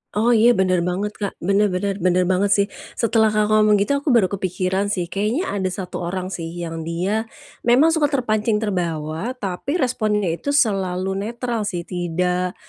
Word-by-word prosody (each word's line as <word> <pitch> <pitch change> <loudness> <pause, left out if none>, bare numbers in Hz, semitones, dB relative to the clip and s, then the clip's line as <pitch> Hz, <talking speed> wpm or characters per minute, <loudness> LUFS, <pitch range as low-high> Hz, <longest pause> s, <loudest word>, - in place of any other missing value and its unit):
Oh 225 +3 +3
iya, 235 +1 +5
benar 185 -1 +2
banget 195 +4 -2
Kak. 200 -2 -3
Bener 200 +3 +3
bener, 195 +1 -2
benar 185 0 +2
banget 190 +2 +1
sih. 200 0 +2 0.3
Setelah 225 -1 +3
Kakak 215 0 +1
ngomong 215 -1 +5
gitu 205 +5 +1
aku 285 - -18
baru 200 -5 +3
kepikiran 190 +1 -1
sih, 180 -4 -2
kayaknya 220 - -1
ada 190 -2 -1
satu 185 0 -5
orang 185 +2 -4
sih 165 -3 -4
yang 165 -1 -6
dia 195 +7 -1 0.4
memang 270 +7 +5
suka 320 -3 +2
terpancing, 225 -6 0
terbawa. 180 0 -2
Tapi 205 - -3
responnya 215 - 0
itu 285 +12 -2
selalu 190 -6 +1 0.2
netral 235 -2 -3
sih, 175 -3 -3
tidak 180 +1 -2
200 Hz, 170 wpm, -21 LUFS, 180-220 Hz, 0.4 s, iya